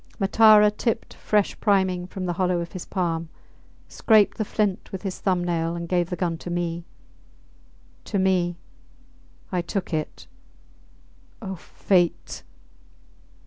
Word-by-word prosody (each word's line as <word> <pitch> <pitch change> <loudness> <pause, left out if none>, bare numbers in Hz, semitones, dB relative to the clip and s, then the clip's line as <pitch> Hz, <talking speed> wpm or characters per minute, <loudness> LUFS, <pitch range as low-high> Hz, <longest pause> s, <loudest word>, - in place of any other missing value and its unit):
Matara 210 +1 +6
tipped 225 +2 -2
fresh 210 -2 0
priming 190 -4 +1
from 185 0 -6
the 175 - -1
hollow 180 0 0
of 170 0 -5
his 185 - -7
palm, 165 -3 -2 0.6
scraped 215 -2 +3
the - - +2
flint 205 -2 -2
with 190 0 -6
his 195 -2 -4
thumb 180 -2 0
nail, 170 -1 -1
and 170 0 -5
gave 175 -1 0
the 180 - -2
gun 170 -2 -2
to 175 - -7
me. 170 -1 -3 1.2
To 205 - -2
me! 180 -2 +1 0.9
I 180 -2 0
took 180 +1 -4
it... 155 -1 -4 1.1
O 195 -4 -5
fate! 175 0 0
180 Hz, 135 wpm, -24 LUFS, 175-195 Hz, 1.2 s, Matara